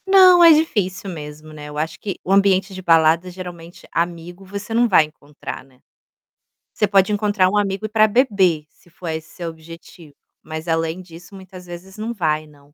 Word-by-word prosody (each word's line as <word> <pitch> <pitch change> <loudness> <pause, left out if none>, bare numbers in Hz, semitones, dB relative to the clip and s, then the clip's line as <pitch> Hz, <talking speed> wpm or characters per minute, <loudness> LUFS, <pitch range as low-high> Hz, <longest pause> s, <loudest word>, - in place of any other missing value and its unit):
Não, 370 -2 +7
é 335 - +9
difícil 205 - 0
mesmo, 155 -1 -9
né, 150 -1 -9
eu 150 - -9
acho 160 +1 -3
que 200 -3 -5
o 185 - -4
ambiente 195 0 +3
de 185 - -7
balada, 165 0 +3
geralmente, 175 -2 -10
amigo 175 +2 -4
você 200 +3 -7
não 240 +1 +3
vai 180 -7 +5
encontrar, 150 -3 -10
né. 130 -1 -25 0.9
Você 210 - +1
pode 195 0 +3
encontrar 205 -3 +2
um 210 - 0
amigo 200 +1 -1
para 215 0 +4
beber, 200 - +2
se 175 - -26
for 170 0 -8
esse 160 0 -5
seu 170 -2 -6
objetivo, 165 -1 -14 0.3
mas, 160 +1 -7
além 165 +2 -1
disso, 180 +1 -14
muitas 185 -1 -12
vezes 180 +3 -11
não 220 +2 -4
vai, 155 -6 -1
não. 145 -1 -22
180 Hz, 185 wpm, -20 LUFS, 160-200 Hz, 0.9 s, é